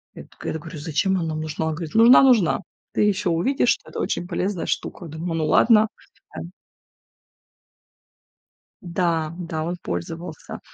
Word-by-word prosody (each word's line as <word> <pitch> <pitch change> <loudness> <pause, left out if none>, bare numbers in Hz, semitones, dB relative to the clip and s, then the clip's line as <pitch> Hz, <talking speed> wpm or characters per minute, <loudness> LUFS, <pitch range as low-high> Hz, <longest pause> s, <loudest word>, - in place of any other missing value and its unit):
Я - - -9
такая, - - -7
да, 160 - -4
говорю: 165 0 -9
"Зачем 165 +5 0
она 175 - -1
нам 155 0 -3
нужна?". 155 0 -3
Он - - 0
говорит: 160 +1 -7
"Нужна 235 +4 +8
нужна. 235 -10 +4 0.4
Ты - - +4
ещё 205 -2 +1
увидишь, 245 +10 +1
что - - -17
это - - -6
очень 175 - -2
полезная 185 0 -2
штука". 175 - -3
Думаю: 160 +2 -5
"Ну 160 - 0
ладно", 220 +6 +5 0.5
э, - - -3
м. 170 - -9 2.3
Да, 170 -3 -1
да, 160 -3 -4
он 175 +2 -3
пользовался. 160 - -6
170 Hz, 160 wpm, -23 LUFS, 160-190 Hz, 2.3 s, Нужна